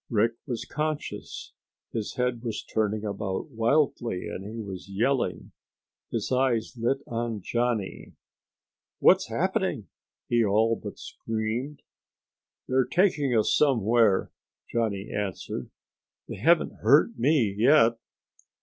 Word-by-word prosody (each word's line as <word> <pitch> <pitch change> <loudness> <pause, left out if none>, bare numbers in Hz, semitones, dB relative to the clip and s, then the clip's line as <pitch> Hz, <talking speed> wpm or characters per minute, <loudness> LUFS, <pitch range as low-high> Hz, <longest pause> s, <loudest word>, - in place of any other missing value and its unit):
Rick 115 0 +2
was 120 -4 -3
conscious. 150 -1 -4 0.4
His 110 -3 -3
head 125 -2 -1
was 115 -3 -3
turning 110 0 -1
about 100 +6 -3
wildly 115 -4 +1
and 95 - -6
he 110 +3 -7
was 100 -3 -7
yelling. 120 +7 -1 0.6
His 115 0 -3
eyes 125 -3 +1
lit 130 +4 -1
on 115 -2 -3
Johnny. 120 -4 -2 0.8
"What's - - +5
happening?" - - -1 0.4
he 120 -1 +3
all 110 +2 +3
but - - -8
screamed. 115 +6 -4 0.8
"They're 130 0 +3
taking 150 - +2
us 110 - +3
somewhere," 115 -6 +3 0.4
Johnny 110 -3 -1
answered. 100 -3 -4 0.6
"They - - -6
haven't - - +3
hurt - - +4
me 125 -5 +3
yet." 115 0 +5
115 Hz, 115 wpm, -27 LUFS, 105-130 Hz, 0.8 s, What's